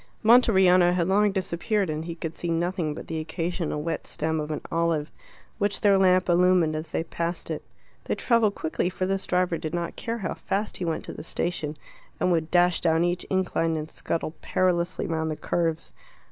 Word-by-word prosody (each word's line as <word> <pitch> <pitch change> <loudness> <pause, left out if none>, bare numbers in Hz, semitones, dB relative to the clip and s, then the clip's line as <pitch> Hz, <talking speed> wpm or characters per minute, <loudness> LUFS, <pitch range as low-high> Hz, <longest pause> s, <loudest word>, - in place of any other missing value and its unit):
Monteriano 190 -7 +6
had 170 -2 +1
long 205 +2 +3
disappeared, 190 +2 -1
and 155 0 -3
he 170 -1 -5
could 165 -1 -5
see 175 - -4
nothing 170 -2 -1
but - - -8
the 160 - -3
occasional 165 -1 -3
wet 165 0 -3
stem 160 0 -1
of 150 0 -4
an 155 - -3
olive, 165 -2 0 0.5
which 205 -1 0
their 205 -2 +5
lamp 185 -1 +4
illumined 175 -2 +4
as 155 +1 -5
they - - -1
passed 170 +1 -3
it. - - -4 0.4
They - - -1
travelled 230 -4 +2
quickly, 160 +3 -1
for 185 0 -2
this 195 0 -2
driver 180 -2 +1
did 160 +2 -4
not 170 -1 -3
care 230 0 -3
how 190 -7 -3
fast 200 +2 -3
he 180 - -3
went 165 -1 -2
to - - -7
the - - -8
station, 160 -2 -3 0.4
and 180 - +2
would 165 -2 +1
dash 175 0 +3
down 165 0 +3
each 175 +1 0
incline 175 -3 0
and 155 0 -4
scuttle 160 -1 -3
perilously 180 -1 0
round 160 -1 -1
the 155 - -2
curves. 165 0 -2
175 Hz, 195 wpm, -26 LUFS, 160-185 Hz, 0.5 s, Monteriano